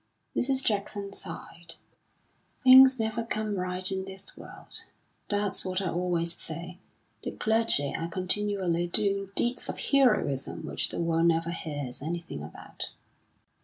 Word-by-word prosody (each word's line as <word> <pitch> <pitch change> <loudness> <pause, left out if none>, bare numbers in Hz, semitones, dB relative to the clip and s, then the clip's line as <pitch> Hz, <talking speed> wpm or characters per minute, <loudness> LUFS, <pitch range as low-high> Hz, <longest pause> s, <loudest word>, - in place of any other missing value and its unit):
Mrs. 265 +1 +1
Jackson 200 -1 -2
sighed. 170 -3 -7 0.9
"Things 260 0 +9
never 220 +1 -1
come 215 -2 -2
right 185 0 0
in 190 0 -2
this 190 0 -9
world. - - -10 0.5
That's 205 -1 0
what 185 0 -1
I 190 -3 -2
always 170 -1 0
say; 170 +2 -7 0.4
the - - -5
clergy 220 -11 +3
are 165 +1 -3
continually 185 -2 0
doing 195 +1 +1
deeds 240 +1 0
of - - -4
heroism 215 - +1
which - - -2
the - - -4
world 165 0 +2
never 165 0 +1
hears 145 -7 -2
anything 165 - -5
about." 75 - -5
185 Hz, 130 wpm, -28 LUFS, 170-210 Hz, 0.9 s, Things